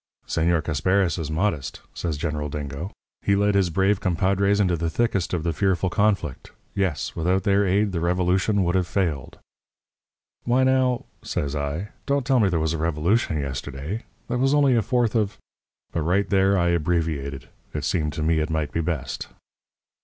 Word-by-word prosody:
"'Señor 85 Hz, 0 st, +1 dB
Casparis 90 Hz, +3 st, +1 dB
is 80 Hz, -2 st, -3 dB
modest,' 80 Hz, -2 st, -1 dB
says 80 Hz, -4 st, -3 dB
General 75 Hz, -1 st, -2 dB
Dingo. 75 Hz, +5 st, -5 dB, 0.3 s
'He 100 Hz, -, +2 dB
led 100 Hz, +1 st, +2 dB
his 95 Hz, -3 st, +3 dB
brave 95 Hz, +4 st, +2 dB
compadres 100 Hz, +3 st, +2 dB
into 90 Hz, -4 st, +3 dB
the 85 Hz, 0 st, -1 dB
thickest 100 Hz, -2 st, 0 dB
of 85 Hz, -3 st, -1 dB
the 85 Hz, -1 st, 0 dB
fearful 95 Hz, +2 st, +1 dB
conflict. 100 Hz, -, 0 dB, 0.2 s
Yes. 95 Hz, -7 st, -1 dB
Without 90 Hz, +3 st, +1 dB
their 100 Hz, 0 st, +3 dB
aid 100 Hz, +2 st, +2 dB
the 85 Hz, -, -2 dB
revolution 90 Hz, +4 st, +2 dB
would 85 Hz, 0 st, +1 dB
have 95 Hz, -2 st, +1 dB
failed.' 80 Hz, -11 st, -2 dB, 1.1 s
"'Why, 125 Hz, +2 st, +3 dB
now,' 130 Hz, -2 st, +2 dB, 0.2 s
says 70 Hz, 0 st, -3 dB
I, 75 Hz, +7 st, -3 dB, 0.2 s
'don't 140 Hz, -2 st, +1 dB
tell 135 Hz, -1 st, +3 dB
me 105 Hz, -4 st, +4 dB
there 85 Hz, -3 st, 0 dB
was 80 Hz, 0 st, 0 dB
a 80 Hz, -, -3 dB
revolution 80 Hz, +3 st, +1 dB
yesterday. 70 Hz, -, -4 dB, 0.3 s
That 125 Hz, 0 st, -1 dB
was 135 Hz, +2 st, +3 dB
only 140 Hz, -3 st, +4 dB
a 115 Hz, -, +3 dB
Fourth 120 Hz, -1 st, +1 dB
of 105 Hz, -3 st, 0 dB, 0.3 s
' -, -, -53 dB
"But 85 Hz, -, 0 dB
right 90 Hz, +6 st, +1 dB
there 95 Hz, 0 st, +3 dB
I 85 Hz, -1 st, +2 dB
abbreviated. 80 Hz, -6 st, -1 dB, 0.3 s
It 75 Hz, -, -2 dB
seemed 75 Hz, -2 st, 0 dB
to 75 Hz, -, -3 dB
me 80 Hz, 0 st, +2 dB
it 75 Hz, -, -1 dB
might 80 Hz, -2 st, -1 dB
be 85 Hz, -, -1 dB
best. 80 Hz, -5 st, -3 dB
90 Hz, 180 wpm, -24 LUFS, 80-100 Hz, 1.1 s, me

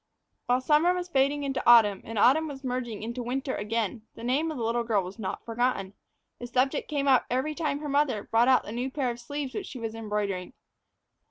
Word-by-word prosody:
While 250 Hz, +1 st, +2 dB
summer 310 Hz, +6 st, +3 dB
was 360 Hz, 0 st, -4 dB
fading 285 Hz, -1 st, +2 dB
into 270 Hz, -1 st, -1 dB
autumn, 210 Hz, -5 st, +6 dB
and 225 Hz, 0 st, -7 dB
autumn 285 Hz, +9 st, +4 dB
was 280 Hz, -2 st, -8 dB
merging 245 Hz, -4 st, -3 dB
into 235 Hz, +2 st, -4 dB
winter 260 Hz, +2 st, -2 dB
again, 220 Hz, +1 st, -2 dB
the -, -, -10 dB
naming 275 Hz, +7 st, +1 dB
of 305 Hz, -, -6 dB
the 235 Hz, -, -3 dB
little 235 Hz, +1 st, 0 dB
girl 215 Hz, -4 st, +1 dB
was 185 Hz, +5 st, -9 dB
not 195 Hz, -, -5 dB
forgotten. 230 Hz, -4 st, -1 dB, 0.5 s
The 245 Hz, -, -6 dB
subject 260 Hz, +4 st, 0 dB
came 285 Hz, -2 st, -1 dB
up 260 Hz, -2 st, +4 dB
every 260 Hz, +5 st, 0 dB
time 295 Hz, -2 st, -2 dB
her 300 Hz, -, -4 dB
mother 280 Hz, -7 st, +1 dB
brought 230 Hz, +2 st, +2 dB
out 260 Hz, -1 st, +5 dB
the -, -, -8 dB
new 245 Hz, +3 st, -2 dB
pair 260 Hz, -2 st, -1 dB
of 235 Hz, -, -8 dB
sleeves 285 Hz, 0 st, -5 dB
which 405 Hz, -, -4 dB
she -, -, -8 dB
was 225 Hz, -2 st, -4 dB
embroidering. 210 Hz, -3 st, -3 dB
250 Hz, 220 wpm, -27 LUFS, 225-280 Hz, 0.5 s, autumn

